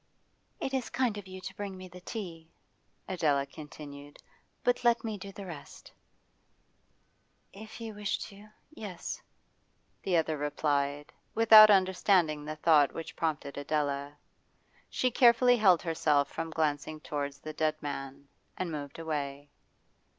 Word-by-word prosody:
'It 270 Hz, -, -3 dB
is 260 Hz, -3 st, -1 dB
kind 250 Hz, -5 st, 0 dB
of 195 Hz, -, -11 dB
you 185 Hz, 0 st, -8 dB
to 190 Hz, +1 st, -8 dB
bring 200 Hz, -2 st, -5 dB
me 185 Hz, 0 st, -9 dB
the 180 Hz, 0 st, -13 dB
tea,' 175 Hz, -6 st, -7 dB, 0.6 s
Adela 150 Hz, -7 st, +1 dB
continued. 145 Hz, 0 st, -11 dB, 0.5 s
'But 245 Hz, 0 st, +1 dB
let 235 Hz, -1 st, +3 dB
me 220 Hz, -2 st, -3 dB
do 195 Hz, 0 st, -8 dB
the 195 Hz, 0 st, -9 dB
rest.' 160 Hz, -6 st, -10 dB, 1.6 s
'If 215 Hz, +3 st, -10 dB
you 225 Hz, -1 st, -6 dB
wish 205 Hz, -1 st, -2 dB
to 205 Hz, +1 st, -13 dB, 0.2 s
yes,' 205 Hz, -, -6 dB, 0.8 s
the 180 Hz, -3 st, +1 dB
other 160 Hz, -2 st, 0 dB
replied, 145 Hz, -1 st, -1 dB, 0.2 s
without 220 Hz, -1 st, +9 dB
understanding 185 Hz, -5 st, +3 dB
the 155 Hz, 0 st, -4 dB
thought 155 Hz, -2 st, +4 dB
which 165 Hz, -, -6 dB
prompted 150 Hz, -3 st, -2 dB
Adela. 145 Hz, -1 st, -2 dB, 0.7 s
She 255 Hz, -, 0 dB
carefully 245 Hz, 0 st, +5 dB
held 185 Hz, -7 st, +5 dB
herself 150 Hz, -4 st, +1 dB
from 165 Hz, 0 st, -4 dB
glancing 155 Hz, -1 st, -1 dB
towards 145 Hz, -2 st, -4 dB
the 155 Hz, +2 st, -8 dB
dead 155 Hz, 0 st, +1 dB
man, 140 Hz, -1 st, -6 dB, 0.3 s
and 180 Hz, -2 st, -3 dB
moved 145 Hz, -2 st, -6 dB
away. 145 Hz, -3 st, -4 dB
160 Hz, 135 wpm, -30 LUFS, 145-200 Hz, 1.6 s, without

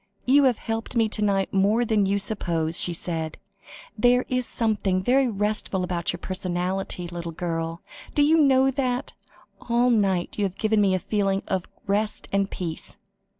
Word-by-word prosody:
"You 275 Hz, +2 st, +5 dB
have 250 Hz, -4 st, +3 dB
helped 225 Hz, +2 st, -4 dB
me 225 Hz, -1 st, +3 dB
to 210 Hz, -, -2 dB
night 195 Hz, -2 st, +1 dB
more 205 Hz, +5 st, +3 dB
than 210 Hz, -3 st, +2 dB
you 200 Hz, +1 st, +1 dB
suppose," 170 Hz, -5 st, 0 dB
she 175 Hz, -, +3 dB
said; 165 Hz, -2 st, -3 dB, 0.6 s
"there 245 Hz, +3 st, +3 dB
is 255 Hz, -1 st, 0 dB
something 205 Hz, -5 st, 0 dB
very 260 Hz, +4 st, +3 dB
restful 210 Hz, -3 st, -1 dB
about 175 Hz, -2 st, -1 dB
your 175 Hz, -, -5 dB
personality, 185 Hz, 0 st, -3 dB
little 170 Hz, -1 st, -6 dB
girl, 165 Hz, 0 st, -4 dB, 0.3 s
do 290 Hz, -, +4 dB
you 315 Hz, +3 st, +4 dB
know 270 Hz, -2 st, +4 dB
that? 255 Hz, -1 st, -2 dB, 0.6 s
All 240 Hz, +1 st, +3 dB
night 195 Hz, -5 st, +1 dB
you 205 Hz, -, +2 dB
have 190 Hz, -1 st, -4 dB
given 215 Hz, -1 st, +2 dB
me 195 Hz, -2 st, +3 dB
a -, -, 0 dB
feeling 195 Hz, -1 st, 0 dB
of 190 Hz, -2 st, -2 dB, 0.2 s
rest 210 Hz, +2 st, -1 dB
and 195 Hz, 0 st, +1 dB
peace." 165 Hz, -3 st, -5 dB
200 Hz, 170 wpm, -25 LUFS, 180-235 Hz, 0.6 s, You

